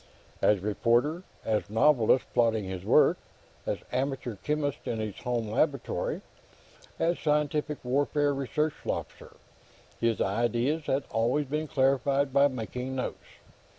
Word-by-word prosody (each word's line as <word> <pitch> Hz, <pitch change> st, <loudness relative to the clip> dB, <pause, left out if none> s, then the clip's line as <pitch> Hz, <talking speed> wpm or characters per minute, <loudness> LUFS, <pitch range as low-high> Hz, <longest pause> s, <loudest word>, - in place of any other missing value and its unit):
As 105 Hz, -3 st, +3 dB
reporter, 120 Hz, -, +1 dB, 0.2 s
as 110 Hz, -2 st, 0 dB
novelist 125 Hz, +1 st, +4 dB
plotting 115 Hz, -3 st, +2 dB
his 95 Hz, -1 st, -5 dB
work, -, -, +4 dB, 0.5 s
as -, -, 0 dB
amateur 130 Hz, -2 st, -2 dB
chemist 145 Hz, +6 st, -2 dB
in 115 Hz, -, -2 dB
his 110 Hz, -2 st, -4 dB
home 120 Hz, -3 st, -2 dB
laboratory, 105 Hz, -, -1 dB, 0.8 s
as 170 Hz, +1 st, +1 dB
scientific 150 Hz, 0 st, 0 dB
warfare 145 Hz, +3 st, +1 dB
research 145 Hz, +3 st, -1 dB
officer, -, -, -5 dB, 0.6 s
his 115 Hz, -3 st, +1 dB
ideas 120 Hz, +9 st, 0 dB
had 135 Hz, +1 st, +1 dB
always 120 Hz, +6 st, +1 dB
been 150 Hz, +3 st, -2 dB
clarified 135 Hz, 0 st, +2 dB
by 140 Hz, +1 st, +6 dB
making 125 Hz, 0 st, -5 dB
notes. 130 Hz, -, -4 dB
130 Hz, 120 wpm, -28 LUFS, 115-145 Hz, 0.8 s, by